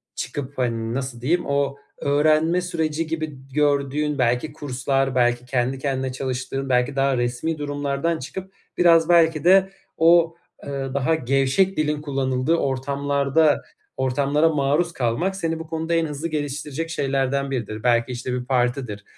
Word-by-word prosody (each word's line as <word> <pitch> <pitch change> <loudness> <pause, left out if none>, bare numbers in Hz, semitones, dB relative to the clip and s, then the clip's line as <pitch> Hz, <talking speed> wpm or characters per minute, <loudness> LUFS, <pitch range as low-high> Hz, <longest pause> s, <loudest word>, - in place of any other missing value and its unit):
çıkıp, 145 0 -5
hani, 115 -3 -1
nasıl 130 -2 -4
diyeyim 170 +7 +1
o 140 0 0 0.3
öğrenme 155 +4 +3
süreci 165 -3 -2
gibi 155 -3 -4 0.2
gördüğün 145 0 +1
belki 125 +4 0
kurslar, 135 -2 -1
belki 120 -1 +2
kendi 125 +1 -1
kendine 130 -1 -2
çalıştığın, 130 +1 -4
belki 125 +2 +1
daha 135 -1 +2
resmî 120 +7 -1
durumlardan 145 +2 -2
çıkıp 190 +8 -7 0.2
biraz 165 -2 +5
belki 165 -3 +4
de 190 +2 +5 0.3
o, 165 0 +5 0.3
ııı, 135 -2 -4
daha 140 +4 +1
gevşek 135 +7 +1
dilin 150 -1 0
kullanıldığı 135 +1 0
ortamlarda 140 +2 +1 0.4
ortamlara 140 +4 +2
maruz 150 +3 +1
kalmak 145 +11 -1
seni 165 -4 -2
bu 160 - -7
konuda 160 +1 -2
en 165 -1 +2
hızlı 150 +1 -4
geliştirecek 150 +1 -4
şeylerden 140 -2 -1
biridir. 110 -4 -4
Belki, 120 0 +2
işte, 125 +1 -4
bir 125 0 -3
partidir. 125 -4 -1
140 Hz, 140 wpm, -23 LUFS, 130-160 Hz, 0.4 s, biraz